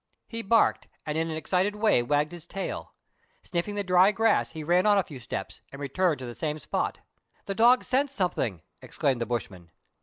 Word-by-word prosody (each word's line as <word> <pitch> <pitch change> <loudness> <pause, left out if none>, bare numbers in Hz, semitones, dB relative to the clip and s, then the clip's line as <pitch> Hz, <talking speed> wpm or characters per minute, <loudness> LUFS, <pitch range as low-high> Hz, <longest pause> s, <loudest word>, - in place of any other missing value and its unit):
He 230 0 -5
barked, 225 +1 +2 0.2
and 150 - -3
in 165 +1 0
an 160 - -3
excited 185 +6 0
way 210 - +3
wagged 145 +5 +1
his 175 -3 -8
tail. 195 0 -5 0.5
Sniffing 185 +3 -3
the 205 - -1
dry 185 +1 +5
grass, 225 +1 +2
he 155 - -7
ran 175 +5 +3
on 205 -1 +5
a 195 - +3
few 140 -6 -10
steps, 95 -5 -6
and 140 - -9
returned 150 +4 0
to 130 - -7
the 120 - -6
same 150 +3 -3
spot. 150 - -3 0.2
" - - -40
The 200 - -2
dog 240 +4 +5
scents 265 +2 +1
something," 125 - -2 0.2
exclaimed 130 -4 -1
the 115 - -1
bushman. 95 -8 -4
175 Hz, 205 wpm, -27 LUFS, 140-205 Hz, 0.5 s, dry